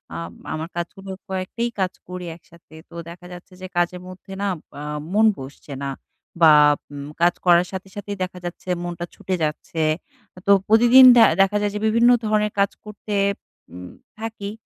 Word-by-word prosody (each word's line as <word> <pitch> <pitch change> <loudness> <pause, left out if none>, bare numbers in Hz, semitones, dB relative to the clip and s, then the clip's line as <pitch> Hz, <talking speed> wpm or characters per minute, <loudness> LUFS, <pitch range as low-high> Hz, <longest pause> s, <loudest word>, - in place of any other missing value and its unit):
আম 85 +1 -6 0.2
আমার 160 +1 -5
কাজগুলো 190 +3 -6 0.2
কয়েকটাই 190 +5 -3
কাজ 185 -1 0
করি 180 0 -7
একসাথে। 170 -1 -21 0.2
তো 170 - -14
দেখা 175 +1 -12
যাচ্ছে 180 +1 -13
যে 185 - -6
কাজের 175 +1 0
মধ্যে 185 +1 -11
না 200 - 0 0.3
আ - - -6 0.3
মন 220 +1 +4
বসছে 140 +1 -10
না। 140 - -2 0.5
বা 160 -2 +8 0.4
উম 140 0 -7
কাজ 175 0 +5
করার 175 0 +5
সাথে, 190 0 -6
সাথেই 205 0 -6
দেখা 180 0 -6
যাচ্ছে 175 +1 -7
মনটা 175 0 -5
ছুটে 185 - -3
যাচ্ছে। 155 +1 -3 0.7
তো 200 - +6 0.2
প্রতিদিন 240 +4 +7
দে 230 - +8 0.2
দেখা 195 +2 +3
যায় 205 -1 0
যে 210 - -2
বিভিন্ন 230 +2 +4 0.2
ধরনের 210 -1 +1
কাজ 200 0 +3
করতে 210 0 -7 0.6
উম 90 0 -9 0.3
থাকি 220 -2 -5
185 Hz, 170 wpm, -22 LUFS, 170-210 Hz, 0.7 s, বা